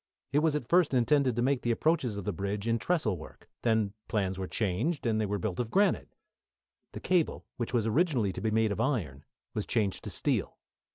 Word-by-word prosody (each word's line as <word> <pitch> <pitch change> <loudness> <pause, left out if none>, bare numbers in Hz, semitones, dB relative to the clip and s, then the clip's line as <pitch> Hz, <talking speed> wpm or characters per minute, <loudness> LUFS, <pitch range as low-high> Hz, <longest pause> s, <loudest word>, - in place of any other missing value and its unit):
It 145 - +5
was 155 -1 +2
at 130 -6 -3
first 170 -4 +3
intended 130 0 +3
to 120 - +1
make 135 0 +1
the 120 - -2
approaches 125 -3 +1
of 100 - -5
the 105 - -1
bridge 100 +4 -3
in 115 0 +2
trestle 130 - 0
work, 80 - -13
then 110 -4 +1
plans 95 -3 -1
were 95 - -3
changed 115 - -1
and 110 -2 +1
they 105 - 0
were 105 +1 -1
built 95 -1 -3
of 120 -2 -1
granite. 200 - +1 0.8
The - - -6
cable, 180 -4 0
which 120 - -3
was 120 -3 +1
originally 120 - +2
to 90 - -6
be 110 - +1
made 110 0 +2
of - - -1
iron, 85 - -1 0.3
was 105 - -3
changed 105 -5 0
to - - -3
steel. - - 0
115 Hz, 215 wpm, -30 LUFS, 100-140 Hz, 0.8 s, It